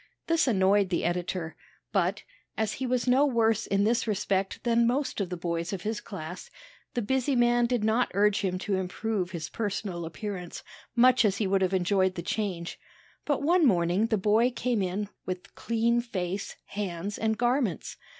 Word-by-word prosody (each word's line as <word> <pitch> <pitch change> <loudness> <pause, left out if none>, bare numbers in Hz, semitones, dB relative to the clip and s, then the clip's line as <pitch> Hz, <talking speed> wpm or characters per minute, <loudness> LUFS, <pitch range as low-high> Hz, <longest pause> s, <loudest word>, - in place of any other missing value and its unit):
This 330 -3 +2
annoyed 195 -3 +3
the 175 - 0
editor; 175 -1 -2 0.4
but, 195 +1 0 0.3
as 220 -1 0
he 260 +3 -3
was 250 -1 0
no 255 +3 +5
worse 225 -4 +2
in 200 0 +2
this 230 +2 +1
respect 195 -2 -1
than 235 -1 +3
most 260 -2 0
of 190 - -2
the 180 - -4
boys 170 +1 -2
of 185 - -4
his 215 0 -2
class, 180 -3 -8 0.5
the 240 - 0
busy 265 +4 +1
man 240 0 +3
did 240 -3 0
not 220 +3 +2
urge 205 0 +3
him 185 -2 -1
to 200 -2 +1
improve 190 +1 -2
his 170 -4 -5
personal 200 -5 -3
appearance, 180 0 -6 0.3
much 255 +1 +5
as 200 -2 +2
he 215 - 0
would 195 0 +2
have 185 -1 +2
enjoyed 185 0 +2
the 170 - -4
change. 185 -4 -3 0.5
But 290 -1 0
one 345 +3 +4
morning 180 +1 +2
the 220 - +1
boy 215 +5 +3
came 245 -3 -1
in 190 +3 -2 0.2
with 185 -1 -5
clean 235 +1 +1
face, 195 -4 -4
hands, 200 0 -4
and 220 -1 0
garments. 240 - 0
205 Hz, 180 wpm, -28 LUFS, 185-235 Hz, 0.5 s, no